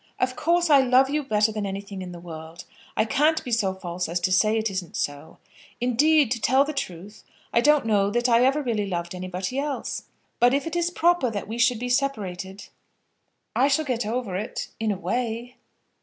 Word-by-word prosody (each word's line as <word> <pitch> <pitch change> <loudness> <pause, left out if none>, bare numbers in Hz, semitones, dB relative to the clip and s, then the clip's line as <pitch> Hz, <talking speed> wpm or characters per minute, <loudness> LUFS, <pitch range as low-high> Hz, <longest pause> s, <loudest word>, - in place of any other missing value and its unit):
Of 255 0 0
course 345 0 +2
I 280 -2 +8
love 260 +1 +4
you 300 +1 +1
better 215 -5 +1
than 215 -1 -3
anything 195 0 -6
in 180 -1 -7
the 175 - -9
world. 165 -1 -9 0.3
I 220 - +3
can't 305 +7 +2
be 245 - -6
so 200 -5 +1
false 180 -2 -4
as 175 +2 -1
to 185 - 0
say 215 +4 +3
it 220 -1 -1
isn't 185 -3 -5
so. 145 +2 -4 0.4
Indeed, 275 +2 +3
to 235 -3 -1
tell 265 +4 +4
the 305 - -4
truth, 200 - -6 0.3
I 235 - +4
don't 295 -1 +4
know 205 -3 +2
that 240 +4 +1
I 235 -1 +5
really 265 -6 0
ever 200 - -2
loved 170 -1 -3
anybody 185 +6 -4
else. 285 -1 -3 0.3
But 245 +2 +5
if 280 - -1
it 330 0 -4
is 345 0 +1
proper 345 -6 +2
that 205 -3 -5
we 225 +2 -5
should 240 0 +3
be 245 +2 -4
separated, 200 -8 -2 0.9
I 265 - +4
shall 290 +2 +1
get 245 -3 -1
over 220 -3 -3
it, 200 - -4
in 220 -1 0
a 200 - -2
way." 235 +5 -3
225 Hz, 205 wpm, -25 LUFS, 190-270 Hz, 0.9 s, I